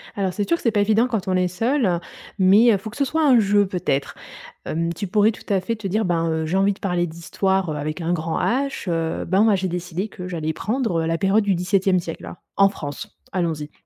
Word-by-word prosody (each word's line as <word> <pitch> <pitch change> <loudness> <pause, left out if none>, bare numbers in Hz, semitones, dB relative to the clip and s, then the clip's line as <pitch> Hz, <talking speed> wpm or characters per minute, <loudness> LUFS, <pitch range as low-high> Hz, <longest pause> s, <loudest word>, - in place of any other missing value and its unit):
Alors, 195 -2 -1
c'est 205 +1 -2
sûr 335 - +2
que - - -14
c'est 230 - +3
pas 205 -1 +2
évident 220 +4 +3
quand 220 -7 -3
on 185 - +1
est 180 0 +2
seule, 200 -1 0 0.4
mais, 200 +5 +6
heu, 205 - +3
faut 220 +3 -8
que - - -11
ce 280 - +2
soit 315 +4 0
un 260 -4 +6
jeu 205 -1 +3
peut-être. 170 -7 -2 0.5
Hem, 165 +1 -2
tu 200 - -4
pourrais 210 +3 +3
tout - - -13
à 195 - +2
fait 230 +5 -3
te 215 -2 -7
dire, 215 +4 0
ben, 165 -1 0
heu: 160 0 -1
«J'ai 175 +4 -1
envie 195 +1 +3
de 200 - -11
parler 180 -3 0
d'Histoire, 180 +2 -1
heu, 150 - -3
avec 155 +3 -4
un 170 +1 -1
grand 160 -1 -2
h. 270 -4 -1
Heu, 165 -1 -1
ben 190 +4 +3
moi 220 -2 +4
j'ai 190 -1 -1
décidé 180 +3 -4
que 180 -3 -8
j'allais 160 -3 -3
prendre, 220 - -1
heu, 160 - -2
la 165 0 0
période 205 +2 +2
du 200 -1 +2
17e 185 +1 +1
siècle 165 -1 -7 0.2
en 195 0 +6
France, 145 -7 -8
allons-y, 160 -5 -2
190 Hz, 245 wpm, -22 LUFS, 170-210 Hz, 0.5 s, mais